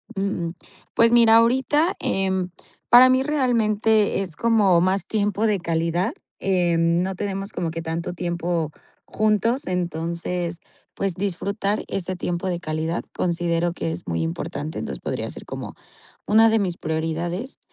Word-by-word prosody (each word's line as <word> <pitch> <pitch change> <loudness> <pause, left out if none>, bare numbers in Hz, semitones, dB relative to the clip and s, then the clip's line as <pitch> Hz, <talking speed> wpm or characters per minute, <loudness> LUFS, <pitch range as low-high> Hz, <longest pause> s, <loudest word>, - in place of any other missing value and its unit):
Uh 195 - -2 0.3
uh. - - -8 0.4
Pues, 230 0 +5
mira, 230 -2 +6
ahorita, 265 +9 +3
em, 190 -1 0 0.4
para 250 +2 +9
mí 260 +1 +3
realmente 220 -7 +2
es 180 -6 -4
como 210 -7 +4
más 190 +2 +1
tiempo 210 0 0
de 205 -3 +1
calidad, 170 - 0 0.3
em, 170 -3 +2
no 185 +2 -1
tenemos 195 0 -4
como 170 -2 -3
que 165 0 -4
tanto 165 +2 -3
tiempo 170 -2 -2 0.3
juntos, 215 +5 +1
entonces, 170 0 -2 0.3
pues, 195 -3 -2
disfrutar 200 +2 -2
ese 185 -1 -3
tiempo 175 +1 -3
de 175 -2 -1
calidad, 160 +1 -2
considero 170 -1 0
que 85 - -3
es 85 +2 -7
muy 85 -1 -1
importante. 150 - -4
Entonces, - - -5
podría - - -3
ser - - -10
como - - -6 0.5
una 225 +2 +6
de 225 0 +3
mis 180 -4 -1
prioridades. 165 - -3
185 Hz, 145 wpm, -23 LUFS, 170-215 Hz, 0.5 s, para